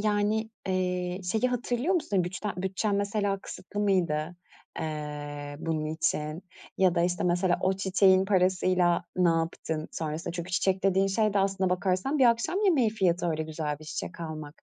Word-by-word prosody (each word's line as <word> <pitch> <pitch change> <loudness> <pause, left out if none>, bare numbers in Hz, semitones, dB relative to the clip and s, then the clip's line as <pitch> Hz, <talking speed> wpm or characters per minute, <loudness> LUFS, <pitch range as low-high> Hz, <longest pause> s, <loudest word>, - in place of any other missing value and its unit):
yani, 215 +1 +1 0.2
eee, 180 -1 -1
şeyi 225 +3 +2
hatırlıyor 245 +7 0
musun? 205 - +1
Güçten 185 +4 -3
bütçen 190 +3 -1
mesela 200 0 0
kısıtlı 205 - -7
mıydı, 175 -5 +1 0.4
eee, 145 -2 -5
bunun 155 -1 -2
için, 155 +1 -2 0.4
ya 185 -2 +4
da, 170 - +2
işte, 175 0 0
mesela 175 0 +2
o 190 - +2
çiçeğin 190 0 +4
parasıyla 185 -2 +2
ne 180 -1 +4
yaptın 165 -1 -1
sonrasında? 155 +1 -4
Çünkü 175 0 -5
çiçek 190 +1 +1
dediğin 195 0 +3
şey 210 +1 +1
de - - +3
aslına 195 -1 +1
bakarsan 185 +10 0
bir 265 - +5
akşam 235 - +2
yemeği 280 - +4
fiyatı, 180 -5 +1
öyle 160 0 -1
güzel 155 -2 -4
bir 155 - -12
çiçek 170 +3 -6
almak. 155 -2 -7
185 Hz, 160 wpm, -28 LUFS, 165-200 Hz, 0.4 s, bir